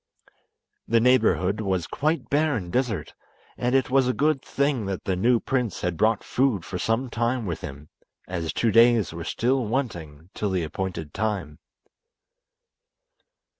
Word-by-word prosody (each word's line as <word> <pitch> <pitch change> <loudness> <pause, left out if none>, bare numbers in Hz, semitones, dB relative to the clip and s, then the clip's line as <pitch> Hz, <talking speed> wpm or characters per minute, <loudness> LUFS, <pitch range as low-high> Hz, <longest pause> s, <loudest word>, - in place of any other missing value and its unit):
The 115 +1 +4
neighbourhood 110 -4 +3
was 95 -5 -1
quite 155 +3 -1
bare 150 0 +2
and 90 -6 -4
desert, 125 -5 -1 0.4
and 125 +2 0
it 130 -1 +2
was 135 -1 +4
a 125 - +1
good 150 0 +1
thing 140 -6 -1
that 95 -2 -4
the 95 - -1
new 115 +6 +3
prince 125 -5 -2
had 90 -1 -1
brought 110 +3 +2
food 125 -9 0
for 90 - -5
some 115 +6 0
time 120 0 -1
with 85 -4 -4
him, 70 +1 -9 0.4
as 85 -3 -3
two 115 - +1
days 115 -5 +5
were 85 0 -6
still 125 +9 0
wanting 85 - -4
till 105 - -2
the 95 -3 0
appointed 80 -1 -4
time. 95 -9 -3
110 Hz, 155 wpm, -25 LUFS, 90-125 Hz, 0.4 s, days